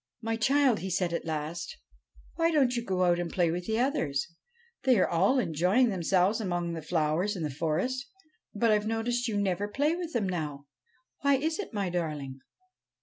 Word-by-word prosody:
' -, -, -51 dB
My 225 Hz, -, +1 dB
child,' 260 Hz, 0 st, +3 dB
he 190 Hz, -, -4 dB
said 180 Hz, -1 st, 0 dB
at 170 Hz, -, -2 dB
last, 160 Hz, -, -4 dB, 0.6 s
'why 330 Hz, 0 st, +2 dB
don't 275 Hz, -6 st, +3 dB
you 235 Hz, -, -1 dB
go 185 Hz, -4 st, 0 dB
out 175 Hz, -1 st, +3 dB
and 175 Hz, -1 st, -3 dB
play 175 Hz, -3 st, +2 dB
with 175 Hz, +1 st, -4 dB
the 220 Hz, 0 st, 0 dB
others? 230 Hz, -, 0 dB, 0.5 s
They 260 Hz, -3 st, +4 dB
are 185 Hz, -, +3 dB
all 190 Hz, +10 st, +2 dB
enjoying 190 Hz, -, +2 dB
themselves 190 Hz, +3 st, +1 dB
among 175 Hz, -4 st, -2 dB
the 165 Hz, -, -5 dB
flowers 160 Hz, +5 st, 0 dB
in 175 Hz, -, -4 dB
the 150 Hz, -, -2 dB
forest; 175 Hz, -, -1 dB, 0.5 s
but 225 Hz, +2 st, +3 dB
I 210 Hz, -, +4 dB
Ve 210 Hz, -, -6 dB
noticed 235 Hz, +2 st, -1 dB
you 215 Hz, -3 st, -1 dB
never 200 Hz, 0 st, 0 dB
play 290 Hz, +9 st, +1 dB
with 345 Hz, -2 st, -5 dB
them 215 Hz, -5 st, 0 dB
now. 150 Hz, -6 st, -4 dB, 0.5 s
Why 280 Hz, 0 st, +3 dB
is 315 Hz, +6 st, -1 dB
it, 410 Hz, -, -5 dB
my 200 Hz, -5 st, -2 dB
darling?' 150 Hz, -6 st, -3 dB
195 Hz, 200 wpm, -29 LUFS, 170-245 Hz, 0.6 s, They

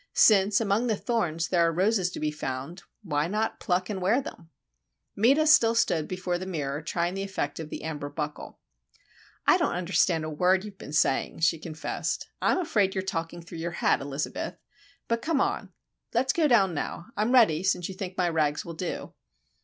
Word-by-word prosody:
Since, 200 Hz, -1 st, +5 dB
among 220 Hz, +2 st, +1 dB
the 220 Hz, -, +2 dB
thorns, 170 Hz, -8 st, -1 dB
there 175 Hz, -2 st, +3 dB
are 165 Hz, 0 st, +4 dB
roses 185 Hz, +2 st, +2 dB
to -, -, -5 dB
be 155 Hz, 0 st, -1 dB
found, 145 Hz, +4 st, -5 dB, 0.2 s
why 150 Hz, -4 st, 0 dB
not 215 Hz, +4 st, -1 dB
pluck 180 Hz, -1 st, 0 dB
and 195 Hz, -3 st, -4 dB
wear 205 Hz, +8 st, +3 dB
them? 170 Hz, -11 st, -9 dB, 0.7 s
Meta 270 Hz, +9 st, +4 dB
still 230 Hz, -7 st, +5 dB
stood 165 Hz, -9 st, +1 dB
before 180 Hz, -1 st, -2 dB
the 185 Hz, -, -6 dB
mirror, 145 Hz, -5 st, -3 dB
trying 170 Hz, +2 st, -1 dB
the 195 Hz, -, -3 dB
effect 190 Hz, -7 st, -3 dB
of 160 Hz, -2 st, -6 dB
the -, -, -6 dB
amber 150 Hz, -2 st, -4 dB
buckle. 150 Hz, 0 st, -6 dB, 0.9 s
"I -, -, +6 dB
don't -, -, 0 dB
understand 175 Hz, -2 st, +1 dB
a 155 Hz, -, -3 dB
word 185 Hz, +5 st, +2 dB
you've 200 Hz, -2 st, -10 dB
been -, -, -9 dB
saying," 150 Hz, 0 st, +1 dB
she 165 Hz, 0 st, +3 dB
confessed. 160 Hz, 0 st, -4 dB
"I'm -, -, +3 dB
afraid 205 Hz, -, +1 dB
you're 190 Hz, -, -1 dB
talking 170 Hz, -2 st, -4 dB
through 170 Hz, 0 st, -9 dB
your 170 Hz, +1 st, -3 dB
hat, -, -, +2 dB
Elizabeth. 140 Hz, +1 st, -4 dB, 0.5 s
But, 230 Hz, 0 st, 0 dB
come 310 Hz, +1 st, 0 dB
on. -, -, -1 dB, 0.4 s
Let's 260 Hz, +3 st, +2 dB
go 320 Hz, -3 st, +3 dB
down 200 Hz, -9 st, +4 dB
now—I'm 210 Hz, +8 st, -3 dB
ready, 220 Hz, -11 st, +5 dB
since 185 Hz, -2 st, 0 dB
you 190 Hz, -, -6 dB
think 185 Hz, -1 st, -6 dB
my 180 Hz, -, +2 dB
rags 155 Hz, -3 st, 0 dB
will 170 Hz, -, -6 dB
do." 170 Hz, +2 st, -5 dB
180 Hz, 190 wpm, -27 LUFS, 160-210 Hz, 0.9 s, I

